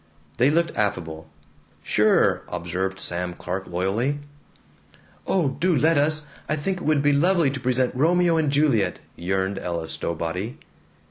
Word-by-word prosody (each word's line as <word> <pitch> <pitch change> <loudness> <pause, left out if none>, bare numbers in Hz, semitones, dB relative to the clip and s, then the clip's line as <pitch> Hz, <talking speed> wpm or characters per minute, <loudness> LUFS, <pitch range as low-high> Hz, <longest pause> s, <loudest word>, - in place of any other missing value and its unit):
They 125 +3 +4
looked 165 +2 +1
affable. 80 -6 -2 0.5
"Sure," - - +3
observed 95 +2 -3
Sam 90 0 -2
Clark 95 +3 -5
loyally. 100 +11 -1 1.1
"Oh, 175 -7 +2
do 170 +6 0
let 155 +2 +3
us! 150 +1 +1 0.2
I 150 - +2
think 185 +6 -2
it - - -8
would 150 -2 +2
be 145 0 +4
lovely 165 0 +3
to 135 - -5
present 125 0 +1
'Romeo 170 +5 +3
and 155 -3 +1
Juliet'!" 140 -8 +2 0.2
yearned 95 +2 -1
Ella 85 -2 -3
Stowbody. 90 - -3
130 Hz, 140 wpm, -24 LUFS, 95-155 Hz, 1.1 s, They